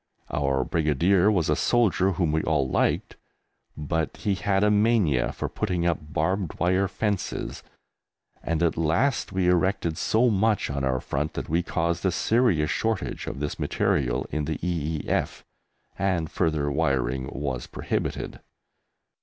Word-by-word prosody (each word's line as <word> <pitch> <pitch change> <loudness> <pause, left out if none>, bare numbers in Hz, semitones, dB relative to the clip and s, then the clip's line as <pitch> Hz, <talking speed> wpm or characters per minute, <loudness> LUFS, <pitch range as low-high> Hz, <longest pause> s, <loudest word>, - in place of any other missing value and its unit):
Our 70 -2 +1
Brigadier 85 +7 +2
was 90 -7 +1
a 75 - +2
soldier 95 -4 +2
whom 85 -4 0
we 80 +1 +1
all 75 -4 +1
liked, - - 0 0.6
but 80 +2 -2
he 100 - 0
had 95 0 +1
a 105 - +4
mania 105 - +2
for - - -4
putting 90 -5 -2
up 85 -1 +1
barbed 80 +4 -2
wire 95 +2 +2
fences, 100 0 -3 0.8
and 85 0 -1
at 85 - +1
last 85 - +1
we 95 -1 0
erected 90 -2 +1
so 120 +2 +3
much 105 -4 +1
on 70 -1 -2
our 65 -1 0
front 75 +3 -3
that - - -4
we 85 +3 +2
caused 85 -1 -1
a 95 - +2
serious 100 -6 +2
shortage 110 -3 -2
of 70 - -5
this 75 0 -3
material 65 -2 0
in 75 -1 -1
the 80 - -2
E.E.F., 80 -3 -2 0.5
and 90 -5 0
further 75 -4 0
wiring 65 -4 0
was 65 -3 -4
prohibited. - - -3
85 Hz, 145 wpm, -26 LUFS, 75-95 Hz, 0.8 s, a